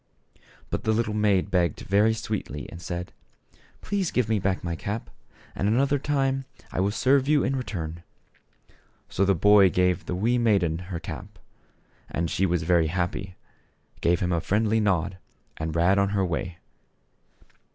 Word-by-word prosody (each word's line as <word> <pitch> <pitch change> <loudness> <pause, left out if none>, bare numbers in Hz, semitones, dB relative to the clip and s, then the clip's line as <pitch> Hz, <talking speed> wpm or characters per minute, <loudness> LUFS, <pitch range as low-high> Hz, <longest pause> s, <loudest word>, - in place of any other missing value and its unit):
But - - -2
the 110 - +2
little 110 -1 0
maid 100 -2 +2
begged 85 -4 +1
very 105 +3 +3
sweetly 95 - -4
and 85 - -9
said, 90 +1 -5 0.3
" - - -31
Please 195 -4 -1
give 125 -3 0
me 110 -2 +2
back 95 -1 -1
my 85 -1 -2
cap, 105 +7 -5 0.4
and 100 - -1
another 135 +6 +2
time 135 -1 0 0.3
I - - -3
will 95 +2 +2
serve 130 +5 +2
you 150 -1 +3
in 135 - 0
return." 85 -10 -4 1.1
So 100 - +1
the 100 0 +3
boy 100 +2 +6
gave 90 0 +1
the 90 - -2
wee 115 +6 +1
maiden 95 -8 +2
her 85 -3 -3
cap. 95 +4 -8 0.7
And 85 0 -2
she 95 - +1
was 85 -2 0
very 85 -1 +3
happy, 90 +2 -3 0.7
gave 85 0 +2
him 90 0 0
a 85 - 0
friendly 110 +4 +1
nod 95 -3 0 0.4
and 80 0 -4
ran 90 +4 +3
on 100 0 +2
her 95 - +2
way. 85 0 -3
95 Hz, 165 wpm, -26 LUFS, 85-110 Hz, 1.1 s, boy